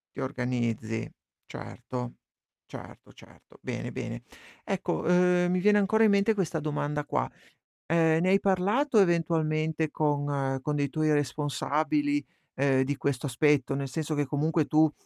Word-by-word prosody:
Ti - - -5
organizzi. 120 -4 -2 0.3
Certo, 125 -1 -7 0.5
certo, - - -11
certo. - - -19
Bene, - - -4
bene. - - -5 0.4
Ecco, 185 -2 -2
ehm, 180 0 +3
mi 180 - +1
viene 210 +2 +4
ancora 220 +3 +3
in 215 - +5
mente 200 +2 +3
questa 175 -5 -1
domanda 150 -1 -2
qua: - - -1 0.6
ehm, 160 0 +3
ne 185 - +2
hai 195 +1 +5
parlato 205 +8 +1
eventualmente 160 -3 +1
con 145 -3 0
con 150 +1 -1
dei 145 -1 0
tuoi 155 +2 0
responsabili, 150 - 0 0.3
ehm, 135 -1 +2
di 140 +2 -2
questo 140 0 -2
aspetto? 140 +1 +2
Nel 140 0 -3
senso 155 +2 -3
che 145 0 0
comunque 155 +3 0
tu, 155 +1 +3
155 Hz, 145 wpm, -28 LUFS, 140-180 Hz, 0.6 s, in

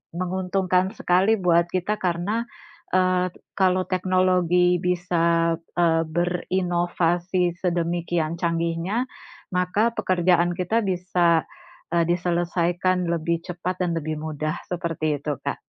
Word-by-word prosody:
Menguntungkan 185 +1 0
sekali 190 +5 +3
buat 170 -1 +3
kita 185 +3 0
karena, 185 +6 -1 0.5
eee, 185 0 +3 0.3
kalau 185 -1 +2
teknologi 185 -1 +2
bisa, 170 -2 +1 0.2
eee, 165 -1 +3
berinovasi 175 0 0
sedemikian 170 -2 -1
canggihnya, 170 +7 0 0.5
maka 190 +6 +2
pekerjaan 175 -3 +2
kita 220 +5 0
bisa, 180 -3 +2 0.5
eee, 170 - +4
diselesaikan 175 +1 0
lebih 170 0 0
cepat 180 +1 -4
dan 170 - -1
lebih 155 -1 -3
mudah, 155 +1 -3
seperti 165 -4 -1
itu, 145 0 -3
Kak. - - -4
175 Hz, 105 wpm, -24 LUFS, 170-185 Hz, 0.5 s, eee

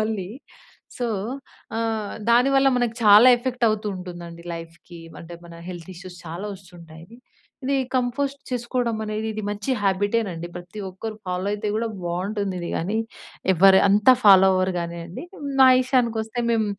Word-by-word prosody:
మళ్ళీ. 215 -4 -2 0.7
సో, 245 - -2 0.7
ఆహ్, 225 -2 -2 0.2
దానివల్ల 270 +3 +4
మనకు 240 -2 0
చాలా 210 +4 +8
ఎఫెక్ట్ 245 0 -2
అవుతూ 215 0 -2
ఉంటుందండి. 175 -2 -9
లైఫ్‌కి 165 +1 -11 0.2
అంటే 170 +1 -10
మన 170 0 -12
హెల్త్ 175 -2 -8
ఇష్యూస్ 180 0 -11
చాలా 170 +6 -6
వస్తుంటాయి. 170 0 -15 0.5
ఇది 275 +1 +1 0.2
కంపోస్ట్ 270 +3 -1
చేసుకోవడం 240 -1 -1
అనేది 215 +1 -3
ఇది 215 0 -5
మంచి 205 +5 -4
హాబిటేనండి. 195 -3 0
ప్రతి 175 +4 -10
ఒక్కరు 215 +4 -7
ఫాలో 180 +1 -2
అయితే 210 0 -3
కూడా 230 +1 -1 0.2
బావుంటుందిది 185 0 -3
గానీ, 200 +7 -1 0.5
ఎవ్వరు 190 +2 +6
అంతా 210 +6 +6
ఫాలో 195 -2 +8
అవ్వరు 185 0 +1
గానీయండి. 170 +1 -6 0.4
మా 260 - +9
ఇషయానికొస్తే 235 -3 0
మేం 225 -1 +2
205 Hz, 135 wpm, -23 LUFS, 180-230 Hz, 0.7 s, మా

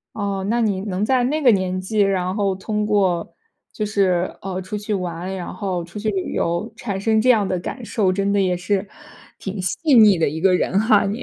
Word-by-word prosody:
哦， 200 -2 -2
那 240 +1 +1
你 205 -4 0
能 195 0 -2
在 255 +1 +2
那 300 +5 0
个 255 -4 +6
年 185 -2 0
纪， 210 +3 -3
然 185 -2 +1
后 200 -2 +1
通 210 +2 -2
过 190 -5 +1 0.4
就 215 - -3
是， 185 -4 +1
呃， 190 -1 -4
出 190 +3 -5
去 210 +1 -3
玩， 180 -1 -3
然 185 -2 -5
后 185 -2 -3
出 170 +4 -11
去 215 +1 -1
旅 195 -3 -3
游 170 +3 -1
产 200 -4 -4
生 220 +1 +2
这 255 - +2
样 215 -5 +4
的 185 - -1
感 250 +7 -6
受， 195 -4 +1
真 200 +1 0
的 200 - +3
也 185 -2 +1
是 195 +2 -1 0.5
挺 195 -1 -5
细 295 - 0
腻 215 -6 +7
的 165 - +2
一 160 +3 -4
个 190 0 +4
人 180 +1 +1
哈， 215 -1 +4
你。 205 +5 -3
195 Hz, 240 characters per minute, -21 LUFS, 185-215 Hz, 0.5 s, 腻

